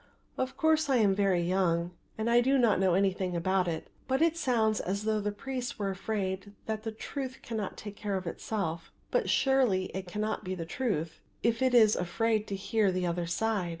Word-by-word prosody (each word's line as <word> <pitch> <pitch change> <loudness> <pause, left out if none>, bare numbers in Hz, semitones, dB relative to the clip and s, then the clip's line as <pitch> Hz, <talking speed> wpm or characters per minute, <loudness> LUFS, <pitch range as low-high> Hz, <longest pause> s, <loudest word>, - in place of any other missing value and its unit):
Of 260 0 -3
course 315 -2 +3
I 270 - +4
am 210 -5 +4
very 190 -3 +2
young 175 -1 +1 0.3
and 220 +1 -1 0.2
do 270 +2 +3
not 230 -7 +4
know 190 -2 +3
anything 190 -2 +1
about 185 +2 +1
it; 165 -2 -3 0.2
but 265 0 +1
it 330 0 +3
sounds 225 -8 +1
as 200 +3 -2
though 215 0 +1
the 210 0 -1
priests 250 +4 -5
were 200 -2 -1
afraid 195 0 -3
that 220 -1 -3
the 225 0 -4
truth 260 +4 -6
can 230 - -4
not 205 -3 -4
take 205 -1 -8
care 205 -2 -2
of 185 - -5
itself; 170 -2 -3 0.2
but - - +1
surely 250 -9 +2
it 190 -1 -5
cannot 215 +4 -2
be 185 0 -3
the 170 -2 -5
truth 165 - -2 0.2
if 230 +1 +1
it 260 -1 +3
is 220 -3 +6
afraid 215 +4 0
to 200 - -3
hear 200 +1 +1
the 180 0 -1
other 170 0 -1
side. 200 +1 0
205 Hz, 205 wpm, -30 LUFS, 185-230 Hz, 0.3 s, is